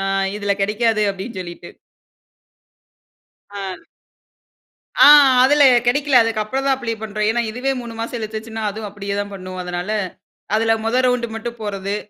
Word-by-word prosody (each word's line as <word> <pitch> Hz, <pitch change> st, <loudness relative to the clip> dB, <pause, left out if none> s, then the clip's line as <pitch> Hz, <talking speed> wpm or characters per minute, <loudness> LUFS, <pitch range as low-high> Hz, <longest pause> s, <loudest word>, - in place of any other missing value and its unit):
அ, -, -, -2 dB, 0.4 s
இதில 205 Hz, -1 st, 0 dB
கெடைக்காது, 215 Hz, +1 st, +1 dB
அப்பிடின்னு 195 Hz, +1 st, -7 dB
சொல்லிட்டு. 175 Hz, -1 st, -9 dB, 1.8 s
ஆ. 195 Hz, -2 st, -7 dB, 1.2 s
ஆ, -, -, +10 dB, 0.4 s
அதில 290 Hz, +2 st, +4 dB, 0.2 s
கெடைக்கல. 275 Hz, +3 st, +1 dB
அதுக்கப்புறம் 225 Hz, +4 st, -2 dB
தான் 270 Hz, -, +3 dB
அப்ளை 235 Hz, -3 st, -3 dB
பண்றோம். 215 Hz, 0 st, -2 dB
ஏன்னா, 240 Hz, +1 st, +1 dB
இதுவே 250 Hz, +4 st, -2 dB
3 235 Hz, -1 st, -8 dB
மாசம் 235 Hz, +1 st, -4 dB
இழுத்துச்சுன்னா, 220 Hz, 0 st, -6 dB
அதுவும் 215 Hz, +1 st, -7 dB
அப்பிடியேதான் 200 Hz, 0 st, -4 dB
பண்ணும். 185 Hz, -1 st, -8 dB
அதனால, 180 Hz, +2 st, -5 dB, 0.7 s
அதில 225 Hz, +1 st, +2 dB
மொத 230 Hz, +3 st, +1 dB
ரவுண்டு 250 Hz, -1 st, +1 dB
மட்டும் 235 Hz, +1 st, -6 dB
போறது. 200 Hz, -1 st, -3 dB
220 Hz, 135 wpm, -19 LUFS, 200-235 Hz, 1.8 s, ஆ